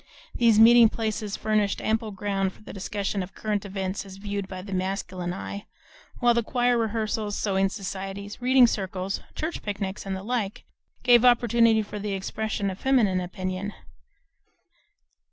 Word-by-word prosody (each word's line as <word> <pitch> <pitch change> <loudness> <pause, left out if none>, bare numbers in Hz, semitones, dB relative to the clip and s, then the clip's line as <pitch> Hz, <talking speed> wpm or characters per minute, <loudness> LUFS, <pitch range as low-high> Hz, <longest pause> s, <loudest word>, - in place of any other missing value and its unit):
These 230 -3 +4
meeting 230 +1 +8
places 215 -2 -3
furnished 215 -2 +1
ample 220 0 0
ground 195 -1 -2
for - - -19
the - - -9
discussion 200 0 -3
of 185 +1 -8
current 210 -2 -2
events 190 0 -3
as 195 -1 -11
viewed 200 -1 -4
by 185 -1 -7
the 195 0 -7
masculine 185 -1 -2
eye, 200 +2 -6 0.5
while 240 -2 +4
choir 245 +1 +1
rehearsals, 220 -2 -1
sewing 195 -2 +1
societies, 195 +1 -6
reading 255 0 +6
circles, 190 -3 -2 0.2
church 320 +2 -3
picnics, 200 -1 -4
and 195 -1 -3
the 190 - -6
like, 215 -3 -2 0.4
gave 245 -1 +6
opportunity 235 -2 +4
for 210 0 -7
the 205 0 -3
expression 200 +1 -2
of 185 - -9
feminine 220 -9 +2
opinion. 185 +2 -4
205 Hz, 150 wpm, -26 LUFS, 195-225 Hz, 0.5 s, meeting